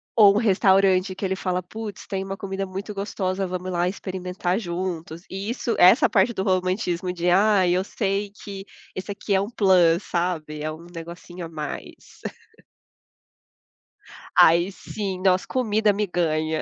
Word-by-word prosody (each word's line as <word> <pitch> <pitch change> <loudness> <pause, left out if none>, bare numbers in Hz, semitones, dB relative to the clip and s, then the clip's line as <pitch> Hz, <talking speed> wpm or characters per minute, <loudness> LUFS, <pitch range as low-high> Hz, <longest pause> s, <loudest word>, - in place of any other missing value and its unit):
ou 205 -3 +7
um - - +3
restaurante 190 -2 +3
que 195 - -8
ele 190 0 0
fala: 185 -2 -2
"Putz, 215 +2 -8
tem 190 -1 -3
uma 195 0 -5
comida 195 0 -4
muito 195 +3 -6
gostosa, 195 -1 -2
vamo 185 0 -4
lá 175 -1 0
experimentar 185 0 -3
juntos". 170 -3 -4
E 195 +3 -5
isso 240 -1 -2
essa 185 +8 +7
parte 235 - +3
do 190 - -2
romantismo 185 -1 0
de: 175 0 0
"Ai, 190 -1 +4
eu 185 +1 +1
sei 200 0 -2
que 200 -1 -9 0.3
esse 190 +2 -6
aqui 200 0 -3
é 190 - +4
um 200 - -3
plus", 185 -6 +4
sabe, 165 -4 -2
é 155 - -2
um 160 +2 -10
negocinho 170 +1 -8
a - - -8
mais. 155 -2 -8 2.2
Aí 170 +4 +6
sim, 195 -1 -5
nossa, 185 -1 +3
comida 220 -4 +2
me 210 +1 -1
ganha. 160 -3 0
185 Hz, 160 wpm, -24 LUFS, 175-200 Hz, 2.2 s, ou